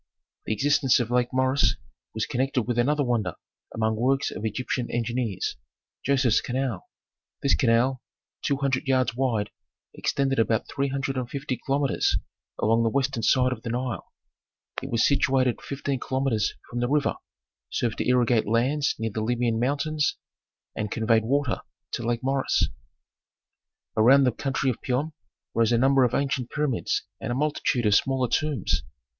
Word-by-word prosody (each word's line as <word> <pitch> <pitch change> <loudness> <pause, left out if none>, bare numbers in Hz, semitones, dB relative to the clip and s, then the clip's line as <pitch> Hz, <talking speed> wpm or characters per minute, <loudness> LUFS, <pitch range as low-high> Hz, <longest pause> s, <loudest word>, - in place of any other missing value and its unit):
The - - +1
existence 140 +3 +3
of 120 -1 -2
Lake 125 0 +2
Moeris 130 +2 +2 0.4
was 110 - 0
connected 130 0 0
with 120 +1 -1
another 145 +4 +2
wonder 115 - 0 0.4
among 110 0 0
works 135 +4 +1
of - - -7
Egyptian 120 +2 -2
engineers, 120 -3 -2 0.5
Joseph's 130 -4 +3
canal. 125 -5 -3 0.5
This 140 - +3
canal, 125 +2 +2 0.4
two 140 - 0
hundred 135 -1 -1
yards 130 -3 +2
wide, 120 -5 0 0.4
extended 135 -2 0
about 110 -1 +1
three 140 0 -1
hundred 135 0 -2
and 125 -2 -3
fifty 140 -1 -3
kilometres 135 +3 +1 0.4
along 115 +2 +2
the 115 - +2
western 135 -1 0
side 125 +3 +3
of 120 -3 -4
the 115 - -5
Nile. 120 -4 -3 0.7
It - - -6
was 115 -1 +2
situated 130 -3 +2
fifteen 140 -1 -3
kilometres 130 -6 0 0.2
from 120 - -3
the 120 0 0
river, 150 0 +1 0.5
served 115 -2 -2
to - - -1
irrigate 120 -3 +3
lands 130 +7 +1
near 115 0 -2
the 110 - -3
Libyan 120 0 0
mountains, 145 +4 0 0.6
and 105 -1 -2
conveyed 110 +1 +2
water 140 0 0 0.3
to - - -3
Lake 120 +1 -1
Moeris. 135 0 +1 1.3
Around 130 +6 +6
the 125 - +3
country 135 +2 -1
of 120 - -8
Piom 140 +5 -1 0.4
rose 115 0 +2
a 120 - +4
number 135 +2 +4
of 125 -1 +2
ancient 135 -3 -1
pyramids 150 -5 -1 0.2
and - - -4
a - - 0
multitude 135 -4 0
of 105 - +4
smaller 130 +4 +2
tombs. 145 - 0
125 Hz, 155 wpm, -26 LUFS, 115-135 Hz, 1.3 s, Around